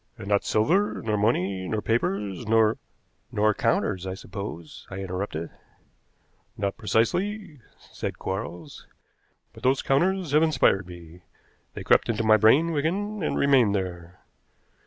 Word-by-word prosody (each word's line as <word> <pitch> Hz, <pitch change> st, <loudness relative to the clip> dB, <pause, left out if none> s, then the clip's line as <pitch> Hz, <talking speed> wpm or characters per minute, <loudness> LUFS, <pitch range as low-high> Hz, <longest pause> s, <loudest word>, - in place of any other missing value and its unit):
"And 95 Hz, -, -9 dB
not 100 Hz, -1 st, +2 dB
silver, 180 Hz, -, +1 dB
nor 110 Hz, -1 st, 0 dB
money, 100 Hz, -3 st, 0 dB
nor 110 Hz, +3 st, -1 dB
papers, 105 Hz, -2 st, -2 dB
nor 110 Hz, 0 st, +3 dB, 0.2 s
" -, -, -44 dB
"Nor 105 Hz, +1 st, +2 dB
counters, 100 Hz, -4 st, 0 dB
I 95 Hz, -, -4 dB
suppose," 95 Hz, -5 st, -8 dB
I 95 Hz, -, -7 dB
interrupted. 95 Hz, -3 st, -4 dB, 1.1 s
"Not 100 Hz, -1 st, -2 dB
precisely," 155 Hz, -, -1 dB, 0.2 s
said -, -, -7 dB
Quarles. 95 Hz, -2 st, -6 dB, 0.7 s
"But -, -, -14 dB
those 130 Hz, +1 st, +2 dB
counters 175 Hz, +4 st, +1 dB
have 150 Hz, +1 st, +4 dB
inspired 130 Hz, -, +2 dB
me. 85 Hz, -1 st, -12 dB, 0.5 s
They -, -, -6 dB
crept -, -, +3 dB
into 115 Hz, 0 st, 0 dB
my 110 Hz, 0 st, +5 dB
brain, 135 Hz, +11 st, +4 dB
Wigan, 190 Hz, +8 st, -2 dB
and 155 Hz, -, -1 dB
remained 130 Hz, -7 st, +4 dB
there. 90 Hz, -2 st, -5 dB
110 Hz, 135 wpm, -25 LUFS, 95-140 Hz, 1.1 s, my